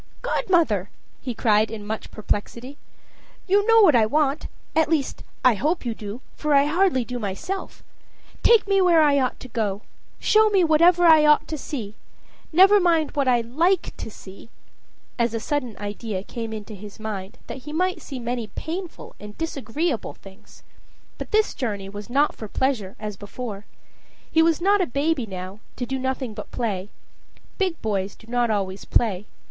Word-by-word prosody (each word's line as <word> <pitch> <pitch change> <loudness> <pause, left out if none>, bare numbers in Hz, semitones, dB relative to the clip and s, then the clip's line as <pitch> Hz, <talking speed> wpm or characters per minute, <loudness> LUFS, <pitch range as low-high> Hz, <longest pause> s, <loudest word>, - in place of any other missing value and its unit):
"Godmother," 330 - +1 0.3
he 250 -3 -4
cried, 215 -1 +3
in 215 -2 -7
much 220 +1 -5
perplexity, 235 +6 -4 0.7
"you 400 +2 +3
know 455 0 +7
what 315 -9 +6
I 220 -2 +4
want, 295 +3 +1 0.3
at 320 -1 +3
least, 305 -5 -1 0.2
I 255 - +7
hope 300 - -1
you 235 - -1
do, 215 +2 -8
for 300 -1 +1
I 280 0 +5
hardly 315 -5 +2
do 250 0 -5
myself 215 - -5 0.6
take 460 -3 +5
me 390 -1 +3
where 340 -3 +5
I 285 -2 +4
ought 255 -1 -1
to - - -8
go; 215 -4 -2 0.4
show 435 0 +4
me 390 -3 +3
whatever 340 +2 +5
I 315 -2 +7
ought 300 0 +4
to 315 - -2
see 245 -8 -5 0.6
never 385 +5 +7
mind 330 -4 +2
what 280 -2 0
I 245 -2 +4
like 330 +11 0
to - - -6
see," 200 +1 -13 0.7
as 235 -1 +1
a - - -1
sudden 255 -3 -3
idea 205 -1 -5
came 225 +1 -6
into 215 0 -7
his 205 +1 -11
mind 215 0 -6
that - - -7
he - - -5
might 365 +4 0
see 270 - -7
many 240 -1 -3
painful 330 - -6
and 210 0 -10
disagreeable 300 -2 -2
things. 195 +1 -16 0.6
But - - -6
this 435 0 +2
journey 205 -6 -4
was 205 +2 -8
not 280 +4 +2
for 220 - -8
pleasure 220 -5 -1
as 210 -2 -5
before. 205 0 -7 0.6
He 325 - +4
was 325 -1 +3
not 400 +3 +3
a 365 - +1
baby 280 -1 0
now, 185 +1 -7 0.2
to 245 - -3
do 265 +2 -3
nothing 260 -2 -2
but 210 0 -8
play 205 -5 -3 0.7
big 370 -4 0
boys 200 -2 -1
do - - -18
not 240 0 0
always 195 -2 -2
play. 210 -4 0
250 Hz, 175 wpm, -24 LUFS, 215-320 Hz, 0.7 s, know